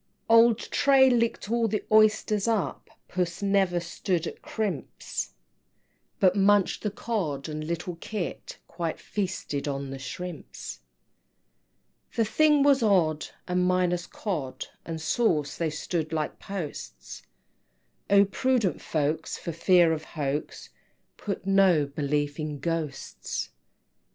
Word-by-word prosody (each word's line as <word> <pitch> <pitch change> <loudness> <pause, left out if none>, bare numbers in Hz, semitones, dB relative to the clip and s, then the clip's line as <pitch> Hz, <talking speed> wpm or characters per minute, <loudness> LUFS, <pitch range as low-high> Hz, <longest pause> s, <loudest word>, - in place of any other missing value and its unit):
XVI. - - -10
Old 230 -1 +7
Tray 270 +1 +4
licked 230 -3 0
all 235 -1 +2
the 215 0 -2
oysters 215 -1 +4
up, 220 -5 -1 0.2
Puss 175 +1 -2
never 195 -3 +2
stood 170 0 -2
at - - -7
crimps, 200 - -4 0.8
But 185 -1 +4
munched 200 -1 +3
the 210 - -1
Cod 195 - -3
and 155 0 -4
little 170 +2 -4
Kit 195 0 -5
Quite 170 -2 -4
feasted 185 -8 -3
on 140 -1 -3
the 135 - -6
shrimps! 145 - -7 1.3
XVII. - - -23
The 225 - +2
thing 295 +6 +4
was 280 -2 +5
odd, 170 -8 +2 0.2
and 180 0 +1
minus 180 -1 +1
Cod 140 -11 -4 0.2
And 165 -1 -4
sauce, 160 - +1
they 165 -2 0
stood 155 +1 -3
like 155 -2 -2
posts; 150 - -7 0.9
Oh, 200 0 +6
prudent 235 -1 0
folks, 155 0 -1
for 170 - -5
fear 170 0 +4
of 155 -1 -4
hoax, 145 -2 -4 0.5
Put 200 -2 -5
no 195 -6 +4
belief 145 +1 -2
in 150 -1 -3
Ghosts! 165 -2 -4
180 Hz, 125 wpm, -27 LUFS, 155-210 Hz, 1.3 s, Old